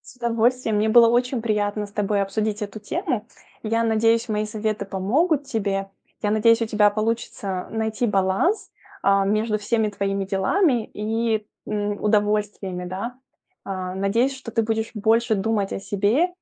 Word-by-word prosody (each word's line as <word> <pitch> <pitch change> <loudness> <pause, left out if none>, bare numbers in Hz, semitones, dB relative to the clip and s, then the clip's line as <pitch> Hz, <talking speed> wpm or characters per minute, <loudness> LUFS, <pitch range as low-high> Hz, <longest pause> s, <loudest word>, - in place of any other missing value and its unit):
С - - -25
удовольствием! 235 -1 +1
Мне 215 +1 +2
было 230 +1 +7
очень 245 0 +1
приятно 210 -1 0
с 205 - -11
тобой 205 -1 0
обсудить 210 +2 -2
эту 205 +1 -6
тему. 255 - -2 0.4
Я 230 +1 0
надеюсь, 225 +1 +2
мои 210 0 0
советы 215 -1 -3
помогут 275 - +1
тебе. 200 -6 -2 0.3
Я 205 - +1
надеюсь, 230 +2 +4
у - - 0
тебя 210 -1 +4
получится 215 -3 -2
найти 220 +1 -1
баланс, 195 - +1 0.3
а, 195 0 +3
между 215 +1 +1
всеми 220 +1 0
твоими 195 -1 -2
делами 230 - +1
и, 220 0 -1 0.2
м, 205 -1 -2
удовольствиями, 210 -3 0
да. 230 +8 -5 0.5
А, 185 -1 -4
надеюсь, 230 +8 +1
что 260 -3 -8
ты 225 0 +1
будешь 220 +1 -2
больше 225 +2 +2
думать 200 0 0
о - - -3
себе 205 - +1
215 Hz, 155 wpm, -23 LUFS, 200-230 Hz, 0.5 s, было